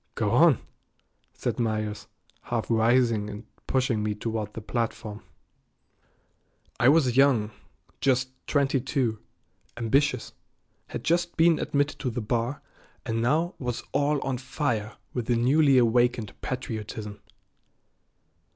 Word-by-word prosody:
"Go - - 0
on," - - +6 0.8
said - - -3
Myers, 110 -2 -2 0.4
half 120 -1 -2
rising 115 -2 +3
and 105 +2 -8 0.2
pushing 130 -4 +1
me 105 0 -1
toward 110 -1 -3
the - - -4
platform. 110 -2 -3 1.6
I 120 - +6
was 140 -5 +4
young, 130 -6 +4 0.5
just 130 -1 +2 0.2
twenty 140 -2 +2
two, 120 -4 -1 0.6
ambitious, 125 +2 +1 0.5
had - - -6
just 175 +1 0
been 165 -1 +5
admitted 145 0 0
to 135 - -1
the 120 +1 -3
bar, 120 +4 -2 0.4
and 115 0 -1
now 160 +9 +1
was 125 -3 -3
all 145 +1 +1
on 130 -2 -2
fire 120 -5 -2 0.2
with 120 -3 -3
the 120 - +2
newly 135 +4 +4
awakened 120 -2 +2
patriotism. 110 -4 -5
120 Hz, 120 wpm, -27 LUFS, 110-135 Hz, 1.6 s, on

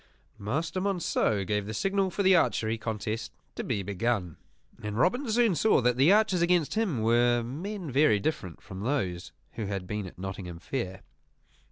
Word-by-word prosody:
Master 160 - -2
Monceux 170 - 0
gave 105 0 -1
the 110 - -4
signal 195 - +1
for 200 +3 -2
the 190 0 +6
archery 115 -9 +2
contest 110 0 -4 0.2
to - - -5
be 105 -6 -2
begun; 100 -3 -1 0.5
and 105 0 -4
Robin 240 - +1
soon 230 -2 +3
saw 215 +6 +3
that 125 -1 +2
the 135 +8 +5
archers 210 -4 +3
against 170 -3 +2
him 190 - 0
were 120 +1 +3
men 170 - -5
very 130 -6 +4
different 95 - -3
from 95 - -9
those 100 -7 -2 0.2
who 110 -3 -5
had 95 -2 -3
been 105 0 -4
at 90 - -13
Nottingham 95 -2 -6
Fair. 95 -1 -5
120 Hz, 170 wpm, -28 LUFS, -, 0.5 s, the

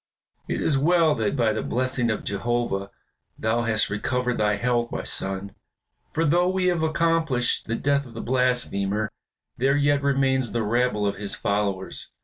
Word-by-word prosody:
"It - - -2
is 140 -4 +2
well 165 +1 +4
that 110 -4 -1
by 115 -5 +2
the 110 - -2
blessing 125 -1 0
of 110 - -2
Jehovah 100 -2 -1 0.5
thou 110 +2 0
hast 110 -3 +1
recovered 125 +4 -1
thy 105 -1 +2
health, 120 +2 0
my - - -3
son, 95 +1 -3 0.6
for 165 - 0
though 175 +4 +3
we 190 0 0
have 175 -2 0
accomplished 160 -5 +1
the 115 - -1
death 140 +1 0
of 115 - -14
the - - -5
blasphemer, 110 -5 0 0.5
there 135 +3 +2
yet 145 0 +2
remains 135 -3 +1
the 120 -1 0
rabble 115 -1 +1
of 100 - -1
his 100 0 -2
followers. 100 -2 -2
120 Hz, 165 wpm, -24 LUFS, 105-140 Hz, 0.6 s, well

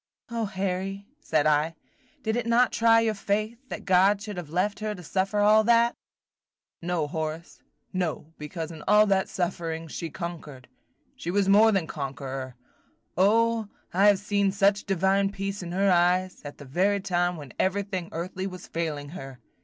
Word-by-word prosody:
"O 230 -1 -1
Harry," 195 0 -3
said 155 - +1
I, 155 +2 +2 0.5
"did 220 0 0
it 240 -1 -2
not 240 +2 +4
try 230 0 +4
your 225 -1 +1
faith, 215 +3 -2
that - - -6
God 195 +2 +4
should 210 0 -7
have 175 -4 -6
left 185 +6 0
her 215 -1 -3
to 180 - -11
suffer 195 +5 -1
all 215 +1 +6
that?" 235 +1 +4 0.9
"No, 170 -2 -1
Horace, 160 +2 -5 0.3
no, 165 -3 -3
because 160 +2 -5
in 160 -2 -9
all 210 0 +6
that 195 -2 +1
suffering 165 -2 -3
she 165 +2 -5
conquered, 155 -6 -7 0.3
– - - -43
she 170 - -5
was 195 +1 +1
more 210 +3 +6
than 195 -5 +1
conqueror. 135 -3 -5 0.6
O, 225 +3 +3 0.3
I 195 +3 +5
have 205 -1 +6
seen 200 0 +1
such 200 +1 +2
divine 195 +1 +2
peace 195 0 -4
in 175 -1 -6
her 195 +2 +2
eyes, 180 +1 +2
at 145 -1 -8
the 145 - -11
very 190 +9 +1
time 175 -2 0
when 145 -5 -10
everything 190 -2 -1
earthly 185 +3 -4
was 185 -2 -8
failing 150 -4 -4
her! 135 -6 -9
190 Hz, 170 wpm, -26 LUFS, 165-205 Hz, 0.9 s, all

